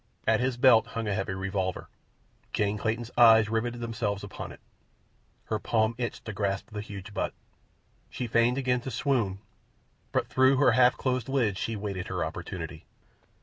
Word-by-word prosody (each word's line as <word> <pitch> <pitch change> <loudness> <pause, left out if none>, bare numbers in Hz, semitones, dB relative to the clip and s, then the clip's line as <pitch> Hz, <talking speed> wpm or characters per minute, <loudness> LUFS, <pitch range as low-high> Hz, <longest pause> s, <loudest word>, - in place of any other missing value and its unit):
At 110 0 +3
his 125 0 0
belt 115 -3 +6
hung 115 -1 -4
a 105 - 0
heavy 95 0 -2
revolver. 95 -1 -2 0.7
Jane 105 0 0
Clayton's 115 +2 -2
eyes 110 -2 +7
riveted 120 +2 -1
themselves 115 -4 -2
upon 100 - -7
it. - - -12 0.9
Her 110 - -2
palm 110 0 +1
itched 120 -2 -4
to 110 - -5
grasp 100 +2 -2
the 105 -1 -4
huge 105 -1 -9
butt. - - -2 0.7
She 125 - -4
feigned 115 +2 +2
again 125 -2 +1
to 130 - -5
swoon, 120 -6 0 0.7
but - - +1
through 130 +1 +4
her 145 - +5
half 125 -1 +4
closed 130 0 -1
lids 115 -8 +1
she 115 - -2
waited 100 -3 -4
her 90 -3 -2
opportunity. 80 - -6
110 Hz, 165 wpm, -28 LUFS, 100-120 Hz, 0.9 s, eyes